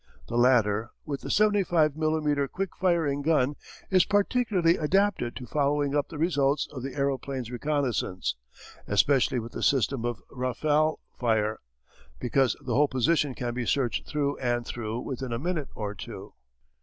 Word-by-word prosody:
The 120 - -5
latter, 115 -3 +3 0.2
with 140 -2 -4
the - - -7
75 185 -8 +3
millimetre 155 -2 +1
quick 190 +6 -4
firing 165 -6 +1
gun, 145 -2 +2 0.4
is 185 -2 +6
particularly 205 -4 +2
adapted 185 -6 +1
to 125 - -7
following 145 +2 0
up 145 - 0
the 160 - -7
results 145 -3 +1
of 130 - -6
the 135 +1 -6
aeroplane's 135 -3 -2
reconnaissance, 125 - -1 0.5
especially 130 +5 +3
with 115 0 -4
the - - -6
system 135 -2 +2
of 120 -1 -2
rafale 145 +5 +1 0.2
fire, 110 -2 0 0.6
because 130 -1 +2
the 125 - -1
whole 145 +5 +4
position 140 +1 +1
can 120 -1 -3
be 120 -1 -3
searched 130 -4 0
through 145 -1 -1
and 120 -2 0
through 115 0 -4
within 130 -1 -5
a 115 - -1
minute 155 +1 -2
or 105 -2 -4
two. 95 - -9
140 Hz, 155 wpm, -27 LUFS, 120-155 Hz, 0.6 s, is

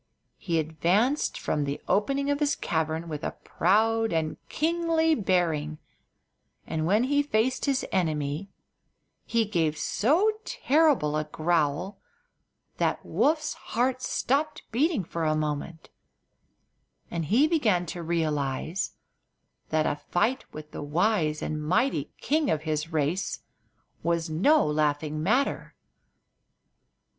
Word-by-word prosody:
He 170 -3 -1
advanced 175 - +1
from 150 - -1
the 140 0 -3
opening 275 +7 +1
of 285 - 0
his 295 -1 +2
cavern 160 0 -2
with 155 -1 -5
a - - -3
proud 225 +5 +2
and 160 -1 -1
kingly 325 0 +1
bearing, 170 - 0 0.9
and 160 0 -2
when 210 +6 +3
he 285 +3 +2
faced 255 -3 0
his 275 -2 +1
enemy 155 0 -1 0.8
he 230 -1 +1
gave 165 -7 0
so 310 - +2
terrible 280 - +2
a 155 0 0
growl 160 +3 0 0.8
that - - 0
Woof's 305 0 +1
heart 255 +2 -1
stopped 285 +5 -1
beating 275 - +1
for 170 0 -4
a 155 -1 +2
moment, 155 +2 -4 1.2
and 165 -2 -2
he 240 - +4
began 220 - +2
to 175 +2 -6
realize 160 0 -1 0.8
that 155 -1 +1
a 145 - -1
fight 235 +9 +1
with 155 0 -9
the - - -6
wise 155 0 +1
and 155 0 -3
mighty 185 - +1
king 300 -1 +1
of 155 -1 0
his 155 +1 -2
race 160 +4 -1 0.6
was 170 -1 -1
no 285 - +4
laughing 150 0 0
matter. 250 - 0
175 Hz, 120 wpm, -27 LUFS, 155-255 Hz, 1.2 s, he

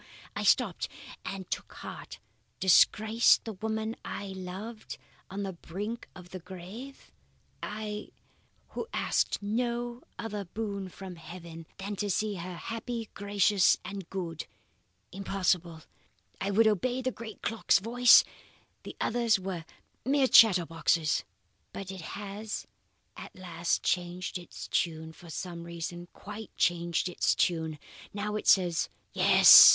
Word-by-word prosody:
I - - -2
stopped - - +2 0.3
and 195 -2 -5
took - - -4
heart. - - -8 0.4
Disgrace 215 +4 +5
the 225 - -7
woman 220 +3 -2
I 200 - -5
loved, 190 +4 -7 0.3
on 200 +2 -4
the 195 -1 -3
brink 205 +7 -6
of 180 -1 -12
the 185 - -6
grave? 190 +10 -10 0.5
I, 210 0 -5 0.6
who - - -5
asked - - 0
no 240 +3 -1 0.2
other 210 -3 -4
boon 200 0 -4
from 185 -1 -9
heaven 165 -1 -10
than 200 +1 -5
to 205 +2 -1
see 210 +2 0
her 180 +1 -6
happy, 230 +3 -5
gracious, 200 -1 +3
and 195 -2 -6
good? 170 -4 -4 0.6
Impossible. 180 -4 -1 0.6
I 195 - 0
would 215 +3 +4
obey 245 +5 +1
the 255 - 0
great 225 -3 -9
clock's 225 0 +3
voice; 240 +4 +7 0.6
the - - -9
others 230 -3 +2
were 185 -3 -5 0.4
mere 275 +2 +3
chatterboxes. 170 -7 +5 0.5
"But 195 -1 -6
it 190 -2 -7
has 205 +4 -5 0.5
at - - -10
last 175 -2 -1
changed 180 +1 -1
its 175 - -9
tune, 160 -1 -1
for 170 +1 -14
some 170 +1 -5
reason, 170 +1 -6
quite 210 +1 -9
changed 170 0 +1
its 180 - +1
tune. 160 -3 0 0.4
Now, 210 +1 -2
it 210 - +6
is 175 -3 -1 0.2
Yes! - - +10
195 Hz, 130 wpm, -30 LUFS, 175-220 Hz, 0.6 s, Yes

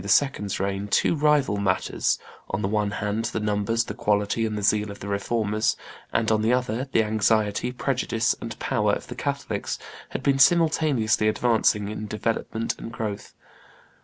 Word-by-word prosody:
's 135 -9 +1
reign, 100 +1 -2
two 105 - +2
rival 150 -7 +2
matters, 95 -2 0 0.3
on 95 - -2
the - - +1
one 105 0 0
hand 105 +2 -2
the 115 - -2
numbers, 105 +2 0
the - - -6
quality, 105 +2 +1
and 110 -1 -3
the 105 - -4
zeal 105 +1 +2
of 100 - -8
the 100 - -7
Reformers, 105 +1 0 0.3
and 110 -1 +1
on 110 -1 +3
the 110 +2 +2
other, 125 +1 0
the 110 - +3
anxiety, 110 +2 +1
prejudice, 125 -3 0
and - - -6
power - - +1
of - - -3
the - - -8
Catholics, - - -3 0.3
had - - -5
been 135 -1 +2
simultaneously 150 -9 +3
advancing 110 -2 +2
in 110 0 -5
development 110 +1 -2
and 115 - -7
growth. 105 -3 -5
110 Hz, 165 wpm, -25 LUFS, 105-120 Hz, 0.3 s, on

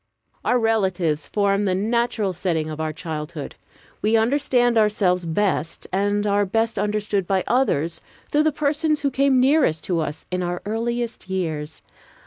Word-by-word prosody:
Our 250 - +2
relatives 190 -9 0
form 200 0 +1
the 185 -2 +1
natural 225 -1 0
setting 160 -3 -1
of 155 0 -5
our 155 0 -1
childhood. 155 -1 -6 0.5
We 220 +2 +3
understand 245 0 +2
ourselves 200 -5 +2
best 165 -2 -1
and 205 +2 +1
are 205 0 +2
best 225 +3 0
understood 205 -2 -1
by 190 -1 +1
others 170 - +1 0.3
through 295 - +3
the 310 - +4
persons 300 +1 0
who 280 -1 0
came 270 0 +3
nearest 260 - +3
to 175 -3 0
us 155 -1 -4
in 180 0 -1
our 175 0 -2
earliest 230 0 -3
years. 160 -5 -3
205 Hz, 150 wpm, -22 LUFS, 170-235 Hz, 0.5 s, the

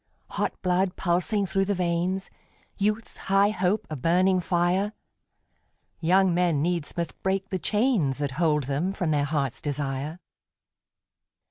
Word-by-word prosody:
Hot - - -2
blood 180 0 +1
pulsing 190 +4 +1
through 195 +1 0
the 205 +1 0
veins, 180 +2 -1 0.4
Youth's 210 +2 -1
high 195 +1 +3
hope 195 +2 0
a 155 - -5
burning 180 +6 +3
fire, 180 +4 +1 1.1
Young 185 +2 +3
men 175 -4 +2
needs 170 0 -1
must 170 -2 -4
break 190 0 -1
the 185 - -2
chains 205 - +1
That 145 -2 -2
hold 150 0 +1
them 145 +8 -1
from 175 -5 -1
their 145 -1 +2
hearts' 140 -4 -1
desire. 145 +2 -3
180 Hz, 135 wpm, -26 LUFS, 155-195 Hz, 1.1 s, high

